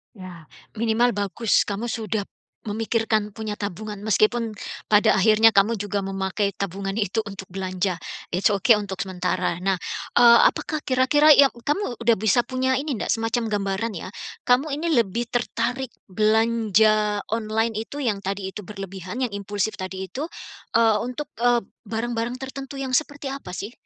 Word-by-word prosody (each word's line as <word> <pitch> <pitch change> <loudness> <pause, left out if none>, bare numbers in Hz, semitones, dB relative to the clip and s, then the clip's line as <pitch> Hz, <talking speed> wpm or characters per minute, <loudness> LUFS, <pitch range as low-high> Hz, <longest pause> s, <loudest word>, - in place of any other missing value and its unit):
Ya. 180 -4 -11 0.3
Minimal 230 +2 +2
bagus 205 +2 +1
kamu 210 +4 -3
sudah 215 -2 -2 0.4
memikirkan 220 0 0
punya 215 0 -5
tabungan 205 +1 -5
meskipun 220 +2 +2 0.4
pada 215 +1 +5
akhirnya 215 +2 +5
kamu 205 +2 +3
juga 205 -1 -2
memakai 195 +1 -1
tabungan 195 +2 -4
itu 215 +2 0
untuk 195 -2 -8
belanja. 185 0 -2 0.3
It's 190 +4 +1
ok 205 +4 +5
untuk 200 -3 -4
sementara. 180 -2 -1
Nah, 190 -2 +1 0.4
eee, 235 -1 +8
apakah 310 -1 -4
kira-kira 290 +4 +4
yang 280 -1 +8 0.2
kamu 295 - -1
sudah 230 0 +2
bisa 220 +3 +3
punya 260 +1 0
ini 275 -3 -2
ndak - - -3
semacam 225 +1 0
gambaran 205 +1 -1
ya, 185 - -6 0.3
kamu 255 +5 +3 0.2
ini - - 0
lebih 230 +3 -1
tertarik 245 +1 -1 0.2
belanja 215 -1 +3
online 225 0 0 0.2
itu 290 0 -5
yang 215 -5 0
tadi 195 0 -4
itu - - -8
berlebihan, 195 +3 -6
yang 240 - -1
impulsif 200 +1 -3
tadi 185 0 -5
itu, 290 +8 -4 0.5
eee, 225 -2 +5
untuk 250 +4 -5
eee 240 0 +3 0.2
barang-barang 230 +2 -2
tertentu 270 +1 -7
yang 270 -1 -4
seperti 285 0 -1
apa 185 -10 -7
sih? 205 +4 -5
220 Hz, 150 wpm, -24 LUFS, 195-240 Hz, 0.5 s, eee